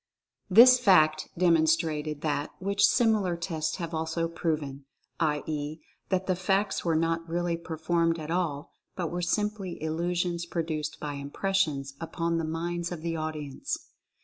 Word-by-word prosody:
This 245 +6 +8
fact 155 -8 +4
demonstrated 160 -3 +2
that 150 -1 -1
which 200 +2 0
similar 215 -7 +2
tests 160 -2 -2
have 170 -2 -5
also 160 +1 -1
proven; 150 -5 -3 0.3
i. 150 -3 +1
e., 150 0 -3 0.3
that 190 -1 +1
the 185 - +1
feats 195 +3 0
were 165 -2 +1
not 165 +1 0
really 175 0 0
performed 165 0 0
at 155 0 -6
all 165 -5 -2 0.2
but 175 -4 -3
were 175 +1 -2
simply 200 0 -1
illusions 170 +2 -1
produced 160 -3 -3
by 150 -1 -4
impressions 140 -1 -1
upon 165 0 -1
the - - -1
minds 170 +2 -3
of 165 -3 -6
the 165 -1 -2
audience. 155 -3 -4
165 Hz, 145 wpm, -28 LUFS, 155-180 Hz, 0.3 s, This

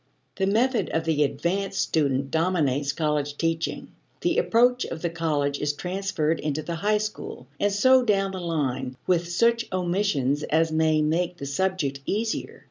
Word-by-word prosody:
The 190 0 +1
method 225 -1 +2
of 160 - -1
the 160 -2 +1
advanced 190 +7 -1
student 140 -3 0
dominates 150 -5 +1
college 150 -2 -1
teaching; 165 0 -2 0.3
the - - +2
approach 245 +2 +3
of 160 - -6
the 170 - 0
college 150 -4 -1
is 145 0 0
transferred 180 -2 -1
into 155 0 -2
the 170 - -4
high 210 +5 +2
school, 210 -11 -5
and 205 - +2
so 260 +6 +5
down 195 -4 +1
the 190 - -5
line, 135 -6 -2
with 170 -1 +1
such 230 +6 +2
omissions 175 -7 0
as 160 +2 +1
may 155 -1 +2
make 175 +3 0
the 140 - -6
subject 140 -2 -1
easier. 220 +2 -2
165 Hz, 160 wpm, -25 LUFS, 150-195 Hz, 0.3 s, so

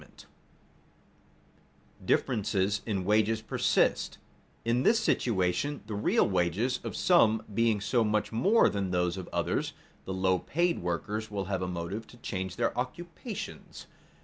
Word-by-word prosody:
[Sidenote: - - -16 1.8
Differences 105 -4 +1
in 95 -4 -1
wages 110 +2 +3
persist] - - +1 0.5
In 120 +2 +2
this 225 - +4
situation 105 +6 0
the 110 - -6
real 105 - +2
wages 95 +8 0
of - - -5
some 110 -12 +4
being 115 0 +2
so 115 +4 +1
much 105 -1 0
more 195 - +4
than 100 -2 -1
those 90 -1 0
of 95 -2 -6
others, - - -1 0.3
the 95 - -4
low 95 -1 +2
paid 170 +2 0
workers 100 +6 -3
will 100 -2 -3
have 95 -1 -2
a 90 - -1
motive 90 +5 -4
to 120 - -15
change 95 -5 -4
their 115 +2 0
occupations. 170 - -6
105 Hz, 140 wpm, -29 LUFS, 95-120 Hz, 1.8 s, this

